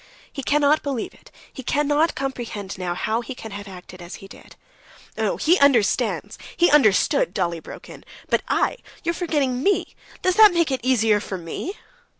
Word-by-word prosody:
He 275 - -5
cannot 290 +2 +2
believe 270 -6 -4
it, - - -19 0.2
he 265 - -7
cannot 295 +4 +1
comprehend 235 -7 -5
now 175 -1 -2
how 220 +5 -1
he 245 +2 -7
can 220 -3 -9
have 200 +1 -7
acted 180 -1 -11
as 175 0 -8
he 195 - -12
did." - - -15 0.6
"No; - - -1
he 345 +4 +3
understands, 270 -7 +2 0.2
he 345 - +4
understood!" 215 - +3
Dolly 170 -1 -1
broke - - -11
in. - - -12 0.2
"But - - +1
I... - - +1 0.3
you 340 - +1
are - - -5
forgetting 290 -8 -1
me... 395 +6 +1 0.3
does 370 +3 +1
it 425 -4 +9
make 335 -4 +2
it 265 - 0
easier 225 -4 +3
for 195 -2 -5
me?" 175 - -6
255 Hz, 180 wpm, -22 LUFS, 200-295 Hz, 0.6 s, it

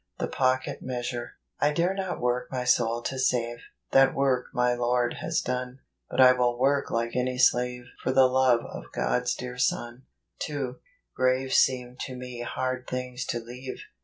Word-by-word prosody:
The - - -2
Pocket 130 0 0
Measure. 120 -1 -4
' - - -50
I 145 - +4
dare 170 +5 +1
not 190 -2 -3
i - - -11
cork 125 0 0
my 130 -1 -2
soul 120 -1 +2
to 130 - -3
save, 120 -2 0 0.3
That 135 0 +5
work 135 -2 +1
my 125 0 +2
Lord 120 0 0
has - - 0
done; 125 0 -3 0.3
But - - -4
I 130 -1 +9
will 125 -1 +1
work 140 +2 +2
like 115 +1 -1
any 125 0 0
slave 125 0 +3 0.2
For - - +1
the 130 0 +6
love 130 -2 +4
of - - -8
God's 125 0 0
dear 125 0 -7
Son." 120 +1 -1 0.3
2. 135 -4 -3 0.4
Graves 130 +1 +2
seem 125 -1 +2
to 130 - -7
me 125 -1 -7
hard 130 +1 -3
things 125 0 -4
to 120 - -1
leave. 125 +3 -8
125 Hz, 180 wpm, -27 LUFS, 125-130 Hz, 0.4 s, I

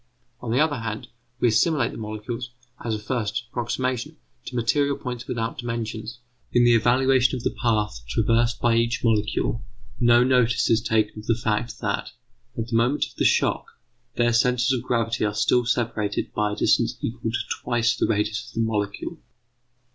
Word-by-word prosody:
On 120 - -6
the 125 - +2
other 150 -2 +2
hand, 115 -1 -5 0.3
we 120 - +4
assimilate 120 +3 +2
the - - -9
molecules, 110 +3 -5 0.3
as 115 -2 -1
a - - -2
first 110 0 -2
approximation, 125 0 -2 0.3
to 125 - -7
material 140 +4 +1
points 125 -1 -6
without 115 0 -3
dimensions; 115 -1 -4 0.3
in 120 - +4
the 120 0 +6
evaluation 130 +3 +3
of 125 - -5
the - - -1
path 105 - +1
traversed 115 - +1
by 120 -1 +3
each 115 +1 +1
molecule 115 +1 0 0.4
no 120 0 +5
notice 125 -1 +3
is 115 0 +4
taken 110 -2 0
of 105 - -11
the 115 - +3
fact 115 0 -2
that, 100 -1 -2 0.4
at 115 0 -3
the 115 - -1
moment 120 +6 +2
of - - -15
the - - +1
shock, - - +2 0.5
their 120 0 +2
centres 125 +2 +3
of 125 - -1
gravity 115 -2 -1
are 105 0 0
still 120 +2 +2
separated 115 -4 -1
by 105 -1 0
a - - -3
distance - - +2
equal 115 -1 -3
to 115 - -1 0.2
twice 120 -1 +1
the - - 0
radius 105 +2 -1
of - - -13
the 115 - +1
molecule. 105 - -3
115 Hz, 180 wpm, -24 LUFS, 110-125 Hz, 0.5 s, the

